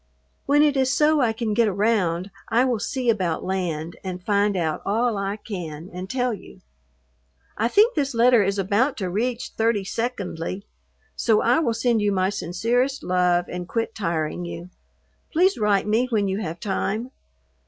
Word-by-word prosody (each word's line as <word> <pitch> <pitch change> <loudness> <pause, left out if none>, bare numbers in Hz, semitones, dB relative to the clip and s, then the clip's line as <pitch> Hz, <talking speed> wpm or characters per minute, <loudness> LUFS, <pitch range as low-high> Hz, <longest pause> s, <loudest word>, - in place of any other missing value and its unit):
When 290 +1 +5
it 295 -2 +3
is 265 -1 +2
so 300 +1 +3
I 235 -3 +3
can 220 -1 -2
get 230 +1 +3
around 195 -3 0 0.2
I 240 +3 +3
will 245 -4 0
see 255 +3 -3
about 185 -7 -1
land 170 -4 -3
and 180 -1 -5
find 205 0 +1
out 160 -3 -1
all 230 +3 +1
I 195 +1 -2
can 170 -6 -7
and 185 +1 -6
tell 250 0 0
you. 200 - -11 0.9
I 225 - +1
think 420 - +4
this 280 -4 -1
letter 240 0 +5
is 200 0 0
about 205 +8 +1
to 185 -4 -3
reach 235 +5 -2
thirty 225 -2 +1
secondly, 200 -4 -4 0.5
so 220 -3 +2
I 245 +5 +4
will 235 -8 0
send 230 -1 +1
you 205 0 +2
my 190 0 +1
sincerest 230 +9 -1
love 180 -1 +2
and 180 0 -6
quit 230 +1 -2
tiring 170 -4 -2
you. 175 +1 -7 0.6
Please 365 +4 +3
write 205 -2 +2
me 225 +4 +2
when 210 -4 +1
you 190 +1 -1
have 170 -4 -5
time. 215 +5 -2
210 Hz, 175 wpm, -23 LUFS, 185-240 Hz, 0.9 s, When